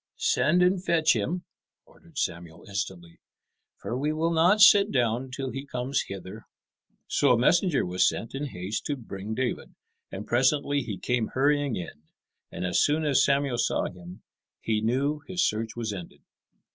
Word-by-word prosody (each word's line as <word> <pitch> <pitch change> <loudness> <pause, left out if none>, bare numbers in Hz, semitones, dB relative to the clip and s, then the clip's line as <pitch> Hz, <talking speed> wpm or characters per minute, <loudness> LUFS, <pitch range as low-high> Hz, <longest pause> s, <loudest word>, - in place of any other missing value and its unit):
"Send 155 +8 +2
and 180 0 +2
fetch 160 -6 +3
him," 165 - -2 0.4
ordered - - -20
Samuel 85 -1 -4
instantly, 95 -4 -5 0.6
"for 120 - -5
we 145 +4 -1
will 160 +2 0
not 175 +6 +4
sit 205 -1 +7
down 125 0 0
till 135 0 -5
he 135 - -5
comes 130 0 -2
hither." 95 -1 -9 0.6
So 140 - +2
a - - +3
messenger 170 - +2
was 90 +1 +3
sent 115 - -6
in 140 +2 -3
haste 95 -2 -5
to 145 - -1
bring 110 -4 -7
David; 130 0 -3 0.4
and 100 +2 -6
presently 140 +3 +2
he 110 -6 -5
came 125 -3 -1
hurrying 145 -1 +2
in, 85 -4 -7 0.5
and - - -4
as 90 -1 +2
soon 155 +2 +2
as 140 -3 +3
Samuel 140 -3 +1
saw - - 0
him 90 0 -12 0.4
he 110 -1 -1
knew 135 +7 0
his 180 -1 +1
search 110 +1 -3
was 115 -3 -3
ended. 90 -4 -9
125 Hz, 165 wpm, -27 LUFS, 105-145 Hz, 0.6 s, sit